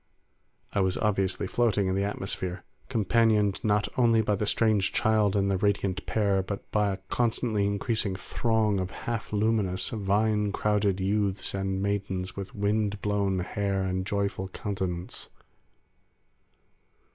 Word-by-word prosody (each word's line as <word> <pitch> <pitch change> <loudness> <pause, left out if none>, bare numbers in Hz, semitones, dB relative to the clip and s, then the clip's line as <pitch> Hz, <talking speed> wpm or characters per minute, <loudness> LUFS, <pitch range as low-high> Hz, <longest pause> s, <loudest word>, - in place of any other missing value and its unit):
I - - +1
was 95 -1 +1
obviously 100 -3 0
floating 105 -1 +1
in 95 - 0
the 100 +1 +1
atmosphere; 95 -3 -3 0.3
companioned 110 -3 +2
not 105 -2 +2
only 115 -2 +4
by 105 - +1
the 105 +1 -1
strange 105 -3 +2
child 110 -2 +2
and 100 -1 +2
the 95 - 0
radiant 100 -1 0
pair, 100 -3 +2
but 100 +1 -6
by 105 -1 +2
a 95 - -3
constantly 115 -3 +1
increasing 100 -1 -1
throng 110 0 0
of 95 -1 -2
half 115 +2 -4
luminous, 105 -3 +1
vine 105 0 +1
crowned 105 -2 +1
youths 100 0 0
and 95 0 -1
maidens 95 -2 -2
with 100 -1 -7
wind 105 0 0
blown 100 -3 +1
hair 100 +1 -1
and 95 0 -2
joyful 100 -1 -1
countenance. 95 -3 -4
100 Hz, 135 wpm, -28 LUFS, 95-105 Hz, 0.3 s, only